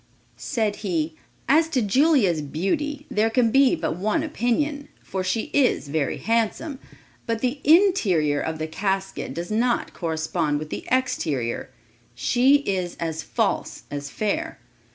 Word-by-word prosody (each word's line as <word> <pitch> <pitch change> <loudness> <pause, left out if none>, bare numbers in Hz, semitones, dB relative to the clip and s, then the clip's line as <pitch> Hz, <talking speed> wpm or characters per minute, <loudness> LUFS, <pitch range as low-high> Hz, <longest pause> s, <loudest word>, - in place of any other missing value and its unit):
Said 220 -6 -1
he, 165 -6 -2 0.3
"As 315 +5 +4
to 285 -5 +1
Julia's 230 - +3
beauty, 280 - -2
there 215 +2 +2
can 230 -1 +2
be 275 +5 +5
but 165 - -2
one 215 - 0
opinion, 290 +1 -1 0.2
for 190 -1 -3
she 185 +4 -2
is 255 - +2
very 145 -2 -1
handsome; 230 +6 -1 0.5
but 230 -1 -1
the 255 +3 -1
interior 220 - +4
of 160 0 -3
the 155 - -3
casket 195 +3 -3
does 170 +4 -5
not 235 +3 +1
correspond 160 -2 -1
with 155 +1 -6
the - - -5
exterior; 155 - -1 0.5
she 255 - +4
is 185 -7 -2
as 160 -1 -2
false - - -2
as 145 0 -4
fair. 310 - -2
215 Hz, 140 wpm, -24 LUFS, 160-270 Hz, 0.5 s, be